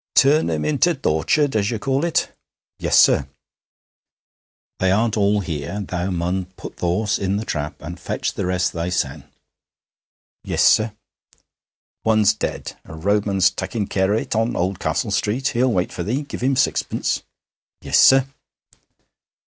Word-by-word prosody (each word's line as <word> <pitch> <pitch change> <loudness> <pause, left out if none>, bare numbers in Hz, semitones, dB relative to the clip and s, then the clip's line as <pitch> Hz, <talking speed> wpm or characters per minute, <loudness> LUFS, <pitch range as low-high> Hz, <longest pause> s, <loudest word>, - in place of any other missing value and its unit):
'Turn 145 - +4
'em 80 -2 -1
into 155 +4 +2
th' 135 - -18
orchard, 110 - +1
as 100 -1 +1
you 115 - -2
call 135 +6 -1
it.' 170 -1 0 0.4
'Yes, - - +3
sir.' 70 - +4 1.5
'They 95 - +2
aren't 110 +3 +2
all 105 -1 +2
here. 85 +3 -4
Thou 90 +1 -2
mun 90 +1 -1
put - - -9
th' - - -22
horse 95 +5 0
in 95 0 -1
the 110 - -4
trap 75 -4 -3
and 85 +4 -7
fetch - - -3
the - - -3
rest 90 0 0
thysen.' 85 +1 -2 1.2
'Yes, - - 0
sir.' 110 0 +4 1.1
'One's 110 -2 +4
dead. - - -5
A 80 - -11
roadman's 100 +2 +2
takkin' 100 +3 -3
care 95 0 0
on 110 - +2
it - - -4
in 115 +2 0
Oldcastle 95 +4 -1
Street. 105 +6 0
He'll 125 +1 +1
wait 90 -4 0
for - - -5
thee. 120 - -2
Give 140 - -8
him 135 +2 +2
sixpence.' - - 0 0.6
'Yes, - - +2
sir.' 135 0 +7
100 Hz, 155 wpm, -21 LUFS, 90-120 Hz, 1.5 s, sir